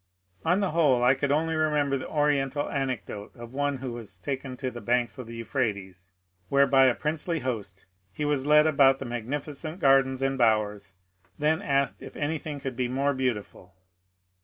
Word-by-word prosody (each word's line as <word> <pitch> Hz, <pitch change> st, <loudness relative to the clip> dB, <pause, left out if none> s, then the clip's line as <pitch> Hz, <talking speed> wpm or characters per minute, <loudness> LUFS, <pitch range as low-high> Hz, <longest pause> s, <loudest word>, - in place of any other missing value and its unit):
On 180 Hz, +5 st, +2 dB
the 195 Hz, -, 0 dB
whole 145 Hz, -7 st, +3 dB
I 125 Hz, +2 st, +6 dB
could 140 Hz, +1 st, -1 dB
only 160 Hz, +2 st, +1 dB
remember 150 Hz, -3 st, +1 dB
the 130 Hz, -, -5 dB
oriental 145 Hz, -1 st, +1 dB
anecdote 130 Hz, -7 st, -4 dB
of 120 Hz, 0 st, -10 dB
one 145 Hz, 0 st, -1 dB
who 130 Hz, -1 st, -5 dB
was 110 Hz, -5 st, -7 dB
taken 130 Hz, +4 st, -5 dB
to 130 Hz, -1 st, -3 dB
the 120 Hz, -, -8 dB
banks 120 Hz, +3 st, 0 dB
of 125 Hz, -, -7 dB
the 115 Hz, -, -8 dB
Euphrates, 100 Hz, -7 st, -3 dB, 0.4 s
where 140 Hz, 0 st, +5 dB
by 135 Hz, -1 st, +5 dB
a 125 Hz, -, +3 dB
princely 160 Hz, +1 st, -2 dB
host 105 Hz, -7 st, -4 dB, 0.3 s
he 150 Hz, +11 st, -3 dB
was 145 Hz, -2 st, +1 dB
led 150 Hz, 0 st, +6 dB
about 140 Hz, -3 st, +5 dB
the 135 Hz, -, -6 dB
magnificent 145 Hz, -, -5 dB
gardens 135 Hz, -2 st, +3 dB
and 135 Hz, 0 st, 0 dB
bowers, 105 Hz, -4 st, +1 dB, 0.4 s
then 155 Hz, +4 st, +1 dB
asked 140 Hz, -6 st, 0 dB
if -, -, -10 dB
anything 150 Hz, 0 st, -3 dB
could 135 Hz, -2 st, -5 dB
be 125 Hz, 0 st, -1 dB
more 135 Hz, +3 st, 0 dB
beautiful. 105 Hz, -8 st, -4 dB
135 Hz, 180 wpm, -27 LUFS, 120-145 Hz, 0.4 s, I